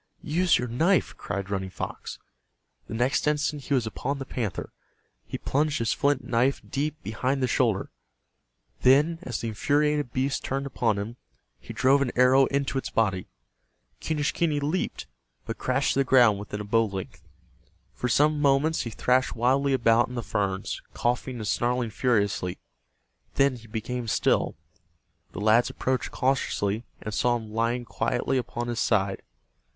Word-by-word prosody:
"Use 175 +3 +3
your 125 - -2
knife!" 165 +11 +2
cried 100 0 -5
Running 95 -1 -2
Fox. - - -6 0.7
The - - -5
next 125 +5 +1
instant 150 -1 0
he 140 - +1
was 125 -3 +1
upon 140 +5 -3
the 135 - -6
panther. 115 -6 -4 0.5
He - - -4
plunged 150 +1 0
his 115 -1 +1
flint 140 -2 +1
knife 125 +3 +1
deep 150 +2 -2
behind 130 +6 -1
the - - +3
shoulder. 115 -6 +1 0.9
Then, 150 +6 +4
as 125 -10 -4
the 115 - -2
infuriated 145 +4 +1
beast 135 +3 -1
turned 135 +1 -2
upon 120 -5 0
him, 110 +4 -5 0.4
he - - -10
drove 135 +2 +3
an 130 -3 0
arrow 130 +2 +5
into 140 -1 -1
its - - -5
body. 95 -5 0 0.7
Quenischquney 150 0 0
leaped, 150 +6 -2 0.4
but - - -5
crashed - - +1
to - - 0
the - - +4
ground 120 -6 +5
within 105 0 -5
a - - -4
bow 115 +2 +2
length. 95 -3 -7 0.7
For 125 - -3
some 150 +4 +3
moments 145 +3 +3
he 120 - -4
thrashed 125 +3 +1
wildly 135 +4 +2
about 115 -2 +4
in 125 - -8
the 120 - -3
ferns, 100 -2 -2
coughing 125 +2 -1
and 110 -3 -5
snarling 120 0 0
furiously. 100 -7 0 0.8
Then 135 -1 +3
he 115 -2 -13
became 115 +2 -4
still. - - +1 0.8
The - - -5
lads 110 +3 +4
approached 130 0 -1
cautiously, 120 -5 0 0.2
and 105 - -5
saw 120 +3 +2
him 110 -2 -6
lying 115 +2 0
quietly 130 +3 0
upon 120 -1 -4
his 120 -1 -2
side. 100 -3 +1
125 Hz, 160 wpm, -26 LUFS, 110-140 Hz, 0.9 s, arrow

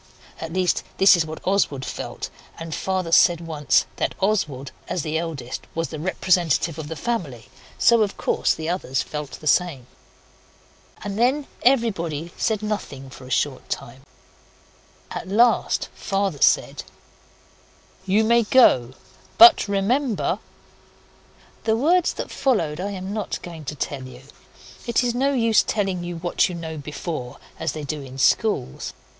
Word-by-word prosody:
At 165 0 -6
least, 185 0 +1 0.2
this 195 0 +7
is 165 -2 0
what 155 0 -8
Oswald 180 -9 +1
felt, - - -6 0.3
and 165 -1 -6
Father 185 -1 -2
said 170 0 +5
once 155 -4 +1
that - - -1
Oswald, 155 -10 -1 0.2
as 175 - -2
the 155 0 -3
eldest, 150 -7 -5
was 165 0 -2
the 155 - -6
representative 170 -2 +1
of 155 - -6
the 160 - -5
family, 155 - -4 0.3
so, 235 -1 +5
of 205 -2 0
course, - - +1
the 160 0 -5
others 165 -7 -1
felt 150 -2 -6
the - - -10
same. 155 -4 +1 1.2
And 205 +1 -4
then 265 +5 +2 0.2
everybody 175 - +1
said 215 -2 -1
nothing 140 -11 -4
for 130 -1 -12
a - - -11
short 130 +1 -1
time. 125 +3 -5 1.1
At - - -5
last 230 +4 +3
Father 195 -7 -2
said - - +3 1.3
'You 205 +4 +3
may 235 +2 +4
go 130 - +4 0.4
but 350 -7 +9
remember 215 +4 0 0.6
' - - -30
The 220 0 +2
words 340 +7 +3
that - - -6
followed 175 - 0
I 200 - -2
am 190 0 -5
not 215 -1 -3
going 165 -3 -9
to 150 - -4
tell 135 -2 -4
you. 125 0 -13 0.6
It 235 +1 +2
is 240 -1 0
no 270 +3 +1
use 230 -4 +4
telling 195 -4 -1
you 175 0 -5
what 175 +2 +1
you 180 - -5
know 160 -2 -6
before 150 -3 -6 0.2
as 160 -3 -2
they 155 - -6
do 150 +1 -4
in 135 -1 -10
schools. 135 - +1
175 Hz, 155 wpm, -23 LUFS, 150-215 Hz, 1.3 s, but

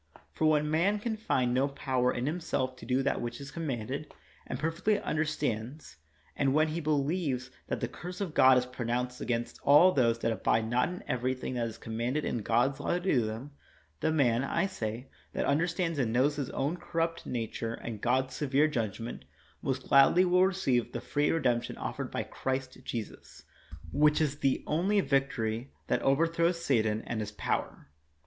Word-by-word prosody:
For 155 - +1
when 150 0 +2
man 180 +7 +2
can 220 +2 -2
find 130 - 0
no 130 +2 +2
power 130 -3 0
in 120 - -2
himself 145 -5 -1
to - - -11
do 130 +2 +2
that 140 - 0
which 120 0 -4
is 140 0 -8
commanded, 140 -2 -4 0.4
and - - -3
per 165 +2 0
fectly 200 +6 +1
understands, 145 - -2 0.4
and 140 -1 +1
when 155 +1 +4
he 160 +2 -2
believes 145 -3 -1 0.2
that - - -3
the - - 0
curse 180 +1 -8
of 190 -6 -3
God 130 -3 +7
is 125 - +1
pronounced 125 0 -3
against 120 -1 -2
all 150 +6 +7
those 120 -7 +2
that 115 0 0
abide 110 +1 +1
not 120 +6 +2
in 180 +1 -7
everything 130 +1 -2
that 120 -2 -1
is 115 -1 -8
commanded 120 +6 -2
in 120 - -1
God's 120 +5 +1
law - - 0
to - - 0
do 175 -9 +2
them, 110 +6 -5 0.3
— 75 -1 -35
the 160 - +2
man, 130 -6 +2
I 170 +6 +1
say, 120 - -4 0.3
that - - -1
understands 165 +2 0
and 120 -4 +1
knows 130 +5 +2
his 140 -3 -2
own 145 +6 -1
corrupt 165 0 -2
nature 115 -1 -3
and 110 -3 -7
God's 130 +1 +1
severe 145 +2 +2
judgment, 115 -5 -3 0.4
most 130 -1 -2
gladly 140 +7 +6
will 180 +1 +5
re 190 - -1
ceive 125 -10 0
the 120 - -2
free 145 +4 0
redemption 125 -7 0
offered - - -4
by - - -2
Christ 130 0 -4
Jesus, 115 -4 -7 0.5
which 150 +2 +4
is 145 -2 0
the 135 - +1
only 185 +7 +2
victory 135 - 0
that - - 0
overthrows 165 +4 +2
Satan 110 -8 +1
and 115 - -3
his 105 0 -4
power. - - -3
135 Hz, 185 wpm, -30 LUFS, 120-155 Hz, 0.5 s, God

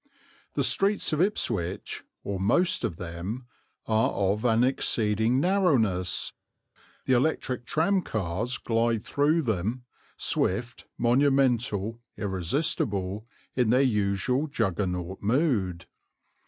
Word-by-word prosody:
The - - +1
streets 200 -4 +2
of 155 - +1
Ipswich, 110 - -1 0.2
or 100 -1 -3
most 125 - +2
of 85 - -1
them, 90 +8 -6 0.4
are 110 0 +2
of 100 +2 0
an 115 0 +4
exceeding 115 -2 +1
narrowness; 135 - +1 0.7
the 130 - +2
electric 125 -2 0
tramcars 125 - 0
glide 115 -1 0
through 155 +3 +2
them, 110 +2 -2 0.3
swift, 115 +5 0
monumental, 120 -4 +2 0.2
irresistible, 100 - -1 0.3
in 125 -3 +2
their 125 +3 +4
usual 110 +4 +1
Juggernaut 95 - -2
mood. 105 - 0
115 Hz, 100 wpm, -27 LUFS, 100-135 Hz, 0.7 s, an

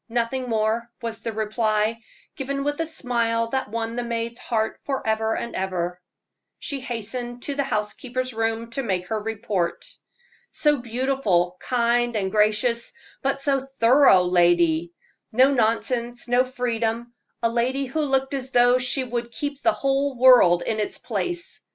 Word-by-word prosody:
"Nothing 245 +2 -1
more," 225 +1 0
was 230 -2 -5
the 225 0 -4
reply, 215 0 0 0.3
given 275 +1 -3
with 290 +2 -1
a 325 - -2
smile 230 -6 -1
that 265 -2 -2
won 230 +1 -3
the 245 - -1
maid's 235 0 -3
heart 220 -2 -2
forever 220 -5 -1
and 235 - -5
ever. 180 -2 -2 0.6
She 280 - -4
hastened 240 0 -5
to 285 - -2
the 280 0 0
housekeeper's 250 +3 -3
room 225 +1 -2
to 275 - -2
make 185 -7 -1
her 220 -1 -1
report. 210 -5 -2 0.6
"So 295 -1 +2
beautiful, 235 -7 0
kind, 240 -1 +1
and 190 -3 -1
gracious; 215 - +1 0.3
but 275 0 -1
so 275 -1 +2
thorough 265 -5 +4
lady 175 -2 +3 0.4
no 260 +5 +5
nonsense, 240 +1 0
no 245 +1 +3
freedom 235 -2 -2 0.3
a 230 - +3
lady 250 +4 0
who 270 +5 -2
looked 270 -2 0
as 265 -1 -3
though 245 0 +4
she 255 +1 0
would 240 -1 -4
keep 285 +3 -4
the 335 - +4
whole 275 -2 0
world 240 -9 +6
in 220 -1 -2
its 210 - -2
place." 350 -1 -4
235 Hz, 150 wpm, -24 LUFS, 220-260 Hz, 0.6 s, world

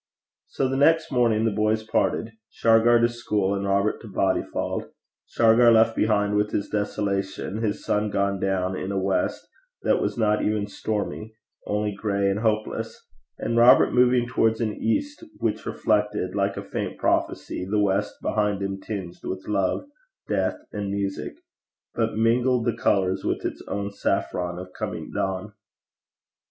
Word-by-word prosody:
So 135 - -1
the 135 +1 -1
next 160 +3 +3
morning 115 -4 +2
the 115 - +2
boys 110 +1 +1
parted 110 +1 0 0.2
Shargar 115 +1 +4
to 120 - +5
school, 105 -5 -1
and 100 0 -2
Robert 100 +2 +1
to 115 - -10
Bodyfauld 95 -1 -1 0.4
Shargar 115 +1 +5
left 115 0 +4
behind 105 -1 +1
with 105 0 +2
his 100 - -2
desolation, 100 0 -2
his 105 -3 -2
sun 105 0 +1
gone 100 -1 0
down 95 -1 0
in 95 +1 -4
a 100 - -2
west 95 0 -1 0.4
that - - +2
was - - -2
not 105 -2 +2
even 105 -1 0
stormy, 105 +1 -4 0.3
only 105 0 0
gray 100 -1 0
and 100 - -1
hopeless, 110 -1 -2 0.3
and 115 - -2
Robert 120 +2 +6
moving 125 -1 +4
towards 115 -3 +1
an 110 -3 -1
east 290 - -2
which 110 -1 -2
reflected, 105 -4 0
like 100 0 0
a - - -4
faint - - -4
prophecy, 90 - -1
the 105 - +1
west 105 0 +1
behind 105 -2 0
him 95 0 -3
tinged 95 -4 -6
with 95 0 -5
love, 100 - 0 0.4
death, - - 0
and 105 -1 -4
music, 100 -1 -3 0.6
but 115 -2 -1
mingled 120 +2 +2
the 120 - +1
colours 95 -1 +1
with - - -2
its - - -4
own 100 0 -3
saffron 90 -3 -2
of 90 0 -9
coming - - -5
dawn. 95 +2 -2
105 Hz, 155 wpm, -25 LUFS, 100-115 Hz, 0.6 s, Robert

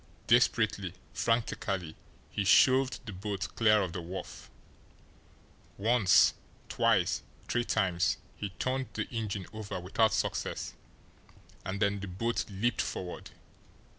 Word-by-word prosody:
Desperately, 100 -4 +2 0.2
frantically 100 -7 -1 0.4
he 105 - -1
shoved 130 +5 +4
the 105 - -6
boat 100 +1 -4
clear 105 -2 +4
of 90 -3 -4
the 90 - -4
wharf. 90 +3 -8 1.3
Once 110 -2 +5 0.4
twice - - +2 0.3
three 120 - +1
times 90 -6 +1 0.2
he 100 - -4
turned 130 +1 -1
the - - -2
engine 105 -5 -3
over 110 -3 -5
without 100 +5 +2
success - - -2 0.9
and 95 +1 -4
then 100 -1 +1
the 100 - -5
boat 115 +6 -1
leaped 105 +4 0
forward. 90 -1 -5
100 Hz, 115 wpm, -30 LUFS, 95-115 Hz, 1.3 s, Once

